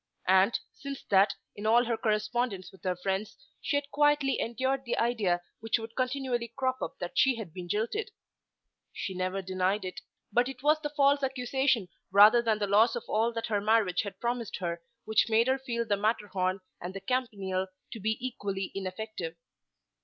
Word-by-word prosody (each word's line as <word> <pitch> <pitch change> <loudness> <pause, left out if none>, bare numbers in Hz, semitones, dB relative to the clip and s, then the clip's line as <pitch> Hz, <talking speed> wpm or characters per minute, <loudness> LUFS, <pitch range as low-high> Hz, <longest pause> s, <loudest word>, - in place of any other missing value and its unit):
And, 190 +4 +4
since 280 -1 -7
that, 195 +1 +5 0.2
in 210 +1 -4
all 240 +3 +5
her 230 0 0
correspondence 215 -2 -1
with 190 - -19
her 180 -1 +1
friends 195 +3 -3 0.2
she - - -1
had 285 0 -4
quietly 295 -2 +3
endured 260 +3 -1
the 235 - -2
idea 210 -7 +1 0.2
which 225 +1 +1
would 225 0 -8
continually 255 -2 -1
crop 260 -1 -1
up - - -4
that 175 - -3
she 265 -3 +5
had 210 -8 -7
been 180 -1 -7
jilted. 230 - -1 0.8
She 190 - -4
never 185 +1 -2
denied 185 +2 0
it; 185 - -6 0.3
but 245 +2 +3
it 265 -1 -9
was 305 +1 +4
the 295 - -2
false 285 -1 +3
accusation 260 -4 +1 0.2
rather 210 +5 +8
than 225 -2 +1
the 210 - 0
loss 215 +4 +4
of 240 - -3
all 225 +2 +2
that 230 0 -3
her 205 -2 0
marriage 210 -4 +3
had 200 -2 -7
promised 240 -2 -2
her 170 -2 -3 0.2
which 220 +1 +3
made 225 +1 +4
her 260 +1 +2
feel 235 -3 -2
the 205 -2 +1
Matterhorn 200 -3 0 0.2
and 180 +2 -6
the 195 - -5
Campanile 195 -5 -1 0.2
to 225 - -6
be 220 +2 0
equally 200 -6 -3
ineffective. 190 -2 -5
220 Hz, 185 wpm, -29 LUFS, 195-255 Hz, 0.8 s, rather